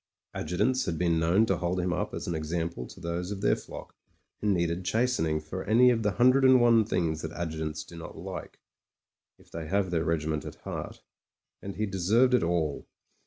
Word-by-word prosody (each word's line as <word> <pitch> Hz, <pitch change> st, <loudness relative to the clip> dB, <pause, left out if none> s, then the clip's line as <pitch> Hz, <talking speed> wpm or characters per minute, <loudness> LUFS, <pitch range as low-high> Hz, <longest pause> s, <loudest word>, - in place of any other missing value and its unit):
Adjutants 105 Hz, +11 st, 0 dB
had 80 Hz, -, -2 dB
been 85 Hz, -1 st, +2 dB
known 85 Hz, +7 st, +3 dB
to 95 Hz, -5 st, 0 dB
hold 90 Hz, +1 st, -1 dB
him 90 Hz, 0 st, 0 dB
up 90 Hz, -, -2 dB
as -, -, -5 dB
an 85 Hz, -, -2 dB
example 80 Hz, -3 st, -3 dB
to -, -, -13 dB
those 85 Hz, +2 st, -3 dB
of 100 Hz, -1 st, -5 dB
their -, -, +3 dB
flock -, -, -10 dB, 0.5 s
who 105 Hz, -, -2 dB
needed 85 Hz, -1 st, 0 dB
chasten 115 Hz, -1 st, +1 dB
ing 75 Hz, 0 st, 0 dB
for 80 Hz, +5 st, -6 dB
any 125 Hz, +3 st, +5 dB
of 115 Hz, -2 st, 0 dB
the 105 Hz, -2 st, 0 dB
hundred 130 Hz, +5 st, +4 dB
and 130 Hz, -1 st, +7 dB
one 115 Hz, -2 st, +5 dB
things 85 Hz, -7 st, -1 dB
that 80 Hz, -, -5 dB
adjutants 80 Hz, -2 st, -4 dB
do 85 Hz, -, -13 dB
not 80 Hz, -, -9 dB
like -, -, -7 dB, 0.4 s
— -, -, -57 dB
^if -, -, -22 dB
they 80 Hz, -1 st, -6 dB
have 95 Hz, +1 st, 0 dB
their 80 Hz, -2 st, +1 dB
regiment 80 Hz, -2 st, -1 dB
at -, -, -8 dB
heart. -, -, -6 dB, 0.6 s
And 100 Hz, 0 st, -6 dB
he 110 Hz, +3 st, -1 dB
deserved 105 Hz, +7 st, +2 dB
it 125 Hz, -, +4 dB
all. 85 Hz, -4 st, -1 dB
90 Hz, 210 wpm, -28 LUFS, 80-110 Hz, 0.6 s, and